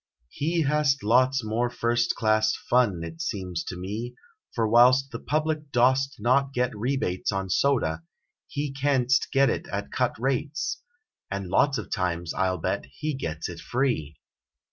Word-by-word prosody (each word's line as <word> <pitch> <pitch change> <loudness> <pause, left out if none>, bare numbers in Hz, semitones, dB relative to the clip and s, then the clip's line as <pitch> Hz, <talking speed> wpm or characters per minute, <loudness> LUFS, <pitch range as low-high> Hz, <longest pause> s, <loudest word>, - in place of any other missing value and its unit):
He 165 - 0
Hast 145 -1 +1
lots 130 +4 +3
more 115 +3 0
first 120 0 0
class 110 0 +2
fun, 110 -9 +1
it 165 - -7
seems 95 - -3
to 90 - -6
me, 105 +7 -5 0.4
For 115 -2 +1
whilst 125 +4 +5
the - - -5
public 155 -1 -2
dost 130 +3 +3
not 135 +5 +2
get 125 -2 0
rebates 110 -5 -1
33 100 - 0
On 95 -1 -5
soda, 90 - +1 0.4
he 145 0 -3
canst 135 -1 +1
get 135 -2 +4
it - - -4
at - - -4
cut - - 0
rates, 140 +5 -2 0.5
And 100 -2 -4
lots 140 +8 +3
of 105 - -7
times, 85 -3 -1
I 95 - +1
11 95 0 -2
bet, - - -1
he 155 0 -3
gets 80 - -4
it 85 -1 -8
free! 115 - -1
125 Hz, 165 wpm, -26 LUFS, 100-140 Hz, 0.5 s, whilst